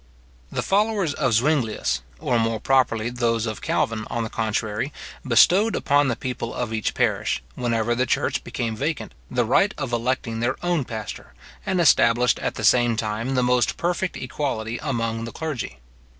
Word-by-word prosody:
The - - -2
followers 205 -5 +1
of 130 -5 0
Zuinglius, 120 - +1 0.2
or 120 - +1
more 115 -1 0
properly 120 -3 +2
those 115 -2 0
of 110 -2 -4
Calvin, 110 -1 -1
on 115 - -2
the 110 - -5
contrary, 110 +3 -1 0.3
bestowed 180 - +5
upon 145 0 +3
the 120 - 0
people 125 -2 -4
of 120 -2 -3
each 110 -2 -1
parish, - - 0
whenever 120 -1 0
the 125 +1 0
church - - 0
became 115 -2 -3
vacant, 150 +7 -3 0.2
the 125 -1 +1
right 195 - +3
of 135 -4 -4
electing 120 -1 -1
their 120 +3 0
own 175 -6 +1
pastor; 110 -4 -7 0.3
and 190 -1 +1
established, 125 -6 +4
at - - -2
the - - -5
same 120 -2 +4
time, 115 +4 -2
the 125 - +2
most 125 0 +2
perfect 175 +1 -1
equality 120 -4 -3
among 115 -2 -2
the 115 - -6
clergy. 150 - -4
120 Hz, 165 wpm, -23 LUFS, 115-140 Hz, 0.3 s, bestowed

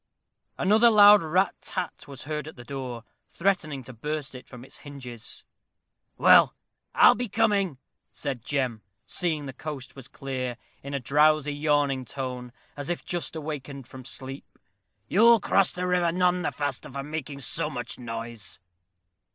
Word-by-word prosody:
Another 220 +4 +5
loud 210 -1 +8
rat 180 +4 +2
tat 185 -4 -5
was 135 -3 -9
heard 150 0 -4
at 155 - -9
the 120 - -11
door, 125 -2 -6 0.3
threatening 165 -7 -1
to 130 - -11
burst 150 +4 -4
it 130 - -10
from 125 -1 -11
its - - -11
hinges. 130 -5 -9 0.7
"Well, - - +6 0.4
I - - +8
be 245 -2 -3
coming," 200 - +1 0.3
said 135 -6 -4
Jem, 130 -6 -1 0.2
seeing 160 -5 -1
the 135 - -6
coast 140 -1 -7
was 135 -3 -11
clear, 130 -3 -4 0.2
in 140 +1 -5
a - - 0
drowsy, 150 +2 +3
yawning 145 -3 +1
tone, 125 -1 -5 0.2
as 145 +1 -6
if 175 - -3
just 175 -2 -3
awakened 145 -3 -6
from 130 -1 -11
sleep. 135 +1 -8 0.5
"You'll 230 - +6
cross 195 -1 +3
the 180 0 -3
river 180 -2 +2
none 180 +1 +2
the - - -1
faster 145 -4 -4
for 140 +1 -5
making 145 -1 -5
so 125 - -2
much 120 -1 -6
noise." 115 -2 -6
145 Hz, 155 wpm, -27 LUFS, 130-170 Hz, 0.7 s, loud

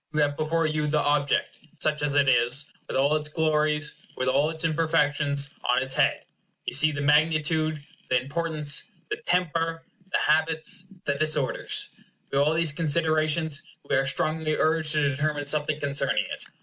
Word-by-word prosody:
You 155 - +3
have 145 -1 +1
before 160 +2 0
you 155 -1 0
the 150 +1 +1
object, 145 -1 0 0.2
such 150 -1 0
as 145 -1 0
it 140 -1 +4
is, 125 +3 +2 0.2
with - - -2
all 140 +3 +3
its 150 -1 -2
glories, 150 -1 +1 0.2
with 130 - -1
all 140 +4 +2
its 160 0 -5
imperfections 150 -3 +1 0.2
on 125 - +4
its 135 0 -3
head. - - +1 0.4
You - - -3
see 155 0 +5
the 145 -1 -4
magnitude, 155 0 +2 0.2
the 125 - +3
importance, 150 +2 -2 0.3
the 425 - -1
temper, 165 - -1 0.3
the - - +2
habits, 160 +5 0 0.2
the 140 - +1
disorders. 150 -1 0 0.4
By 140 - +1
all 150 +3 +3
these 165 -2 +2
considerations 155 -1 0 0.3
we - - +1
are 135 +1 +2
strongly 155 +2 0
urged 155 -1 +1
to 150 -2 +2
determine 145 +1 -1
something 150 +1 -1
concerning 140 -1 0
it. - - -7
150 Hz, 165 wpm, -26 LUFS, 145-160 Hz, 0.4 s, see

